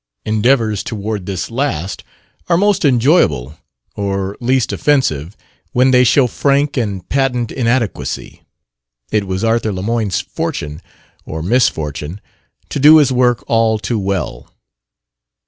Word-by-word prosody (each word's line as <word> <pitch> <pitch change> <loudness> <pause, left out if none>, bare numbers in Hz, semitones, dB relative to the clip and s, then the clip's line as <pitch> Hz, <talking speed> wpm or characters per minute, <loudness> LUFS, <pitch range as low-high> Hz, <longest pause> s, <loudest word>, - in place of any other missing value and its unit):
Endeavors 110 -1 +1
toward 105 -4 -4
this 95 +2 -4
last 100 - -2 0.5
are 170 - +4
most 205 +1 +2
enjoyable 120 - +2 0.4
or 100 -1 -2
least 125 0 +1
offensive 100 - 0 0.4
when 130 +1 +4
they 125 0 +5
show 125 +2 +4
frank 140 +3 +1
and 100 -8 -3
patent 125 -4 0
inadequacy. 120 -3 -2 0.7
It 105 -2 0
was 95 +2 -3
Arthur 115 -1 +1
Lemoyne's 100 0 -1
fortune 75 +2 -4 0.4
or 80 0 -6
misfortune 80 - 0 0.5
to - - -3
do 150 +3 +8
his 145 -4 +4
work 125 -1 +2
all 115 -1 +2
too 110 +1 -2
well. 100 -2 -3
115 Hz, 120 wpm, -16 LUFS, 95-130 Hz, 0.7 s, do